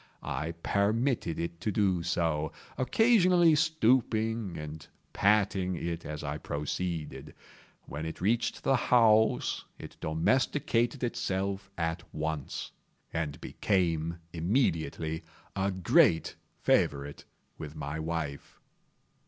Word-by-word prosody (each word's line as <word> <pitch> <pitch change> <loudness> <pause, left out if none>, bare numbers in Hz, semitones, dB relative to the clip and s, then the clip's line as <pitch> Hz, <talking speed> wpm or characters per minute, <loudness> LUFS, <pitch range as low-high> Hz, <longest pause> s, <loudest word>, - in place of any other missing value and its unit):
I 75 +5 -3
permitted 110 - +1
it 85 0 -4
to 105 - 0
do 95 -4 +2
so; 80 -3 0 0.2
occasionally 180 - +4
stooping 115 - +1
and 75 0 -7 0.3
patting 100 -3 +2
it 85 -1 -4
as 75 -1 -5
I 75 +1 -3
proceeded. 80 +3 -4 0.5
When 75 +3 -5
it 80 - -6
reached 115 +6 0
the 135 - +3
house 110 -3 +3
it - - -10
domesticated 120 - +1
itself 100 -4 -2
at 85 0 -1
once, 80 -2 -3 0.4
and 80 -3 -2
became 85 -4 0 0.2
immediately 80 - 0 0.3
a 95 0 +1
great 90 -3 +3 0.3
favorite 70 0 +1 0.3
with 75 0 -7
my 75 +1 -4
wife. 80 -3 -4
90 Hz, 105 wpm, -30 LUFS, 80-110 Hz, 0.5 s, occasionally